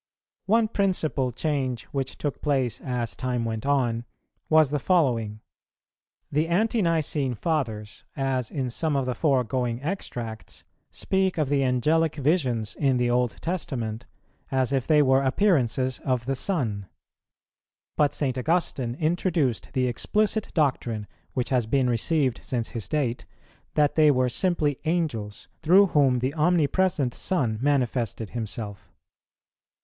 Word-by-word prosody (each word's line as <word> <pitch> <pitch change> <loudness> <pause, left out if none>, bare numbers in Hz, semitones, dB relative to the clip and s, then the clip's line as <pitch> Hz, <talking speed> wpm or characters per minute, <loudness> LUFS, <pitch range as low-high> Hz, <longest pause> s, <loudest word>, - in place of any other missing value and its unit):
3. - - -3
One 225 0 +4
principal 180 - 0
change 130 -3 -2
which 135 -2 -3
took 145 - -4
place, 135 -5 0
as 125 -3 -3
time 125 -2 -2
went 110 +2 -3
on, 120 -5 +1 0.5
was 155 -3 +5
the 145 - 0
following: 120 - +1 0.9
the 150 +3 +1
Ante 215 +6 +1
nicene 155 -6 0
Fathers, 115 -8 -3
as 130 -3 -1
in 130 -4 -3
some 155 +4 -1
of 135 -2 +1
the 125 - -1
foregoing 125 -3 0
extracts, 120 - -5 0.3
speak 190 -2 0
of 150 -4 0
the 140 -1 +2
Angelic 150 +6 +2
visions 130 - 0
in 135 -3 +1
the 120 0 +1
Old 125 -2 +1
Testament 125 -10 -3 0.4
as 130 0 0
if 135 -2 0
they 150 -2 +5
were 130 0 +4
appearances 130 - +1
of 125 -3 -1
the 135 +1 -1
Son; 120 - -1 1.1
but 145 -1 +3
St. 130 -3 -1
Augustine 130 -5 0
introduced 155 - 0
the 130 -2 +1
explicit 210 - 0
doctrine, 125 - 0 0.3
which 125 - -2
has 125 -4 +1
been 130 +2 +2
received 125 +2 +1
since 120 -3 -2
his 115 -4 -5
date, 135 -6 -1 0.5
that 150 -1 +3
they 155 -1 +5
were 130 -2 +3
simply 155 -2 0
Angels, 150 -12 -2
through 180 +6 +6
whom 135 -4 +4
the 130 +3 -1
Omnipresent 160 -3 +2
Son 120 -12 -1
manifested 125 -6 0
Himself. 110 -3 -5
135 Hz, 135 wpm, -25 LUFS, 120-155 Hz, 1.1 s, through